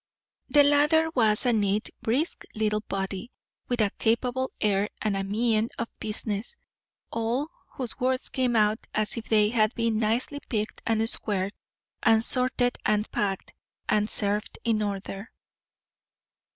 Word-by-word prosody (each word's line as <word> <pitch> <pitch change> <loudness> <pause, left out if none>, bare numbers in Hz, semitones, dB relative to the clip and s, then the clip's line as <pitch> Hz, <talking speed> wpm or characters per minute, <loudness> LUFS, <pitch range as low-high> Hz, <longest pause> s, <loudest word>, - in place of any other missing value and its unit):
The 290 -1 +6
latter 300 +3 +4
was 220 -2 +4
a 245 - +3
neat, 205 0 0
brisk 255 +9 -1
little 215 -1 0
body, 195 +1 -4 0.4
with 245 -2 0
a 205 -2 +2
capable 250 +3 +1
air 205 -1 +1
and 210 -2 0
a 195 - -1
mien 220 +2 +1
of 230 - -3
business; 215 - -2 0.6
all 235 +6 -1 0.2
whose 255 -2 -6
words 255 0 0
came 255 -2 0
out 215 0 +3 0.2
as 215 0 +1
if 230 -1 -5
they 210 -1 +3
had 220 -1 +2
been 230 -2 +1
nicely 235 +6 0
picked 215 -2 -2
and 225 0 +2
squared, 200 -3 0 0.5
and 225 0 +4
sorted 250 -1 +1
and 210 0 +1
packed, 195 -2 -2 0.3
and 210 0 +2
served 210 0 0
in 225 -2 +1
order. 200 0 -4
220 Hz, 140 wpm, -27 LUFS, 210-245 Hz, 0.6 s, The